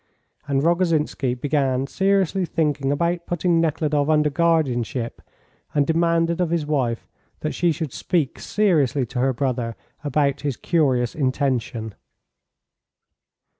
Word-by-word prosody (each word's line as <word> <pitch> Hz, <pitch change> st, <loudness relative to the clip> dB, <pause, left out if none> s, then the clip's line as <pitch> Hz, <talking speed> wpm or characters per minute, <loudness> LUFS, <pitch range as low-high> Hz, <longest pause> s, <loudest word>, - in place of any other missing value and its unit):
And 140 Hz, -1 st, +1 dB
Rogozhinsky 160 Hz, -7 st, +1 dB
began 135 Hz, -1 st, 0 dB
seriously 195 Hz, +3 st, +1 dB
thinking 150 Hz, -5 st, 0 dB
about 170 Hz, +4 st, -1 dB
putting 175 Hz, -1 st, +1 dB
Nekhludoff 150 Hz, -2 st, 0 dB
under 150 Hz, -1 st, +3 dB
guardianship, 135 Hz, -7 st, 0 dB, 0.5 s
and 145 Hz, -1 st, +3 dB
demanded 165 Hz, +2 st, +1 dB
of 175 Hz, -, +1 dB
his 165 Hz, -2 st, 0 dB
wife 130 Hz, -6 st, -1 dB, 0.3 s
that 155 Hz, -, -2 dB
she 175 Hz, -1 st, +2 dB
should 155 Hz, -4 st, -4 dB
speak 165 Hz, -7 st, -1 dB
seriously 150 Hz, -, +1 dB
to 125 Hz, +2 st, -5 dB
her 135 Hz, +2 st, +2 dB
brother 125 Hz, -3 st, -2 dB, 0.3 s
about 145 Hz, -1 st, +1 dB
his 140 Hz, -4 st, -2 dB
curious 130 Hz, -8 st, +1 dB
intention. 130 Hz, -5 st, -1 dB
150 Hz, 120 wpm, -22 LUFS, 130-165 Hz, 0.5 s, under